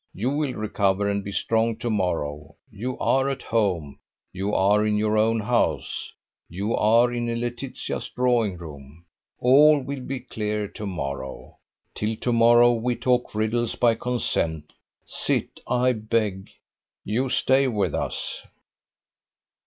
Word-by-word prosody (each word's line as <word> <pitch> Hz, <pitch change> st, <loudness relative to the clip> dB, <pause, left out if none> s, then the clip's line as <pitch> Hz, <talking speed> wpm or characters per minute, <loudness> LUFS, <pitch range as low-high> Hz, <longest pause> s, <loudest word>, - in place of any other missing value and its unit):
You 120 Hz, +7 st, -1 dB
will 145 Hz, -2 st, -1 dB
recover 100 Hz, -2 st, 0 dB
and 100 Hz, 0 st, -1 dB
be 100 Hz, -, -6 dB
strong 115 Hz, +2 st, +1 dB
to 120 Hz, +1 st, -3 dB
morrow: 80 Hz, -6 st, -2 dB, 0.2 s
you 120 Hz, +5 st, -5 dB
are 135 Hz, +1 st, +2 dB
at 135 Hz, -1 st, -4 dB
home; 90 Hz, -11 st, -1 dB, 0.3 s
you 95 Hz, +2 st, -2 dB
are 105 Hz, +2 st, +3 dB
in 105 Hz, -1 st, +1 dB
your 105 Hz, 0 st, +1 dB
own 110 Hz, +1 st, +2 dB
house; 115 Hz, +3 st, -1 dB, 0.4 s
you 100 Hz, +6 st, -2 dB
are 115 Hz, +3 st, +4 dB
in 120 Hz, -1 st, -2 dB
Laetitia's 120 Hz, +2 st, -4 dB
drawing 120 Hz, -6 st, +1 dB
room. 75 Hz, -1 st, -11 dB, 0.3 s
All 145 Hz, +4 st, +6 dB
will 140 Hz, +1 st, -5 dB
be 130 Hz, 0 st, -5 dB
clear 105 Hz, -3 st, -3 dB
to 105 Hz, -, -7 dB
morrow. 70 Hz, -7 st, -6 dB, 0.3 s
Till 110 Hz, +1 st, -2 dB
to 120 Hz, +2 st, -1 dB
morrow 120 Hz, +1 st, +6 dB
we 120 Hz, +1 st, -1 dB
talk 125 Hz, -3 st, 0 dB
riddles 110 Hz, +2 st, 0 dB
by 120 Hz, -2 st, +3 dB
consent. 85 Hz, -10 st, -2 dB, 0.3 s
Sit, -, -, -2 dB
I 125 Hz, +1 st, +2 dB
beg. 110 Hz, -4 st, -1 dB, 0.5 s
You 125 Hz, +6 st, -1 dB
stay 130 Hz, +2 st, +3 dB
with 105 Hz, -5 st, 0 dB
us." -, -, -3 dB
110 Hz, 135 wpm, -24 LUFS, 100-125 Hz, 0.5 s, All